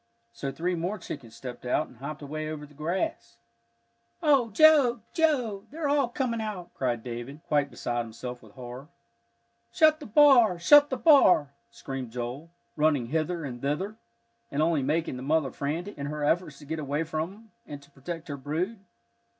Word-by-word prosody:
So 135 +3 -4
three 175 +5 -2
more 175 +5 -2
chickens 120 - -8
stepped 125 +1 -8
out 125 +5 0
and 125 - -18
hopped 145 +4 -7
away 155 +2 -4
over 150 -1 -6
the 145 - -18
grass. 155 -3 -3 0.9
"Oh, 275 -6 +4
Joe, 260 -1 +5
Joe, 255 - +1
they're 310 +1 -3
all 285 -3 +2
coming 240 -3 -2
out!" 205 -5 -6
cried 120 -3 -2
David, 125 +5 -7
quite 145 -2 +2
beside 120 -1 -3
himself 120 +2 -8
with 110 -2 -17
horror. 125 +2 -9 0.8
"Shut 310 -1 +4
the 295 - -9
bar! 240 -6 +6
shut 290 +11 +7
the 260 - -2
bar!" 215 - +5 0.2
screamed 130 +1 -6
Joel, 125 +7 -5 0.3
running 150 -6 +2
hither 160 +2 -1
and 120 -3 -7
thither, 170 +10 -2 0.5
and 145 +2 0
only 160 -3 +2
making 150 0 -1
the - - -7
mother 145 0 +1
frantic, 165 +10 -4
in 140 - -3
her 150 0 -4
efforts 150 -1 0
to 145 - -13
get 160 +2 -4
away 145 +2 -1
from 160 +2 -3
him, 220 +2 -17 0.2
and 145 - -7
to 140 - -21
protect 165 +5 -7
her 145 -2 -5
brood. 165 +10 -3
155 Hz, 175 wpm, -28 LUFS, 135-210 Hz, 0.9 s, shut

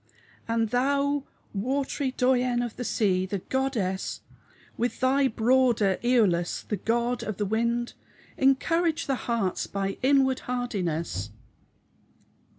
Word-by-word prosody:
] - - -30
An 225 -1 +2
thou 280 +4 +1 0.3
watery 265 +5 -1
dyane 250 -1 +2
of 235 - -7
the 245 - -4
se 190 -5 +1
the 200 - -2
goddes 215 -4 -2 0.5
With 240 +2 -2
thy 270 +1 +3
broder 230 -4 +2
eolus 205 -9 +2
the 210 - -1
god 235 +4 0
of 215 -3 -4
the 210 - -1
wynde 235 +3 0 0.4
Encourage 315 +5 +2
the 275 - 0
hertes 225 -6 0
by 195 0 -3
in 275 +1 +5
warde 265 -1 0
hardynes 175 - -2
Of 105 - -19
240 Hz, 130 wpm, -27 LUFS, 200-260 Hz, 0.5 s, in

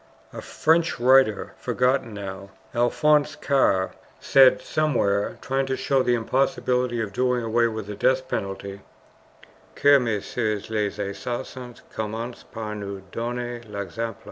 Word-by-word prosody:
A - - -6
French 160 -2 +1
writer, 125 -4 +4
forgotten 125 -2 +1
now, 100 -1 -7 0.2
Alphonse 150 +5 +2
Karr, 130 -11 +2 0.3
said 135 -2 +6
somewhere, 120 -10 0
trying 135 +1 -1
to 130 -1 -1
show 135 -2 +1
the 125 -1 +2
impossibility 125 0 0
of 105 -3 -3
doing 125 +1 +1
away 115 +1 +2
with 110 -2 -5
the 105 - -6
death 130 +5 +1
penalty: 100 -3 -4 0.9
"Que 145 0 +6
messieurs 110 -2 -2
les 105 -2 -1
assassins 120 +4 -5
commencent 115 +3 -5
par 110 -2 -5
nous 100 -2 -6
donner 120 0 -4
l'exemple." 105 +2 -5
120 Hz, 125 wpm, -24 LUFS, 105-130 Hz, 0.9 s, said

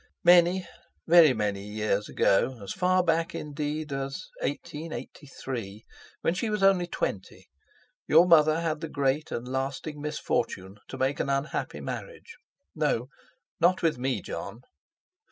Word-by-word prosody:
Many, 175 +1 +5 0.4
very 165 -3 +7
many 105 -2 -2
years 105 0 -2
ago, 125 +6 +2
as 100 - -5
far 185 0 +2
back 165 0 0
indeed 150 0 -4
as 135 0 -4 0.2
1883, 135 - -6 0.4
when 165 - +1
she 215 +5 -2
was 210 -2 -1
only 190 -3 +4
twenty, 100 - -4 0.6
your 165 +3 +7
mother 155 -1 +5
had 160 -2 -2
the 165 - -4
great 140 +1 0
and 120 +1 -4
lasting 135 +3 -4
misfortune 100 -9 -2
to - - -7
make 135 +1 0
an - - -1
unhappy 140 +2 -2
marriage—no, 280 - -5 0.5
not 175 +2 +3
with 160 -6 +1
me, 125 -6 -1
Jon. 100 +7 -6
150 Hz, 130 wpm, -27 LUFS, 130-170 Hz, 0.6 s, very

